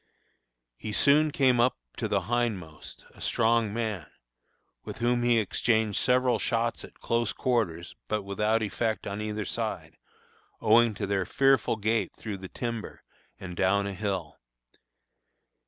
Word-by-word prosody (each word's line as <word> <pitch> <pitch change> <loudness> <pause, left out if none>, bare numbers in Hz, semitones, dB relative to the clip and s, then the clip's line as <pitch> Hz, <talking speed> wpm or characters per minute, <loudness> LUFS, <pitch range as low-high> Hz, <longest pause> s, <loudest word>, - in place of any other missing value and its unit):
He 105 - -6
soon 150 +6 +5
came 130 -4 +3
up 125 +2 +3 0.2
to - - -1
the - - +1
hindmost, 100 -8 -3
a - - -17
strong 115 -1 +2
man, 105 -8 -3 0.8
with - - -7
whom 120 +1 +1
he 120 -1 +3
exchanged 110 0 +1
several 125 0 +2
shots 115 0 0
at - - -13
close 115 -3 0
quarters, 100 -9 -1
but 105 -1 -1
without 105 +3 0
effect 110 +1 -2
on 100 +1 -4
either 105 -1 -3
side, - - -4 0.6
owing 115 0 +4
to 100 - -3
their 95 -2 -1
fearful 135 -3 +3
gait 110 +1 0
through 105 -3 -5
the 95 -1 -9
timber 115 -3 -5 0.4
and 90 -2 -7
down 100 +2 +2
a 100 - -3
hill. 95 -7 -4
110 Hz, 140 wpm, -28 LUFS, 100-120 Hz, 0.8 s, soon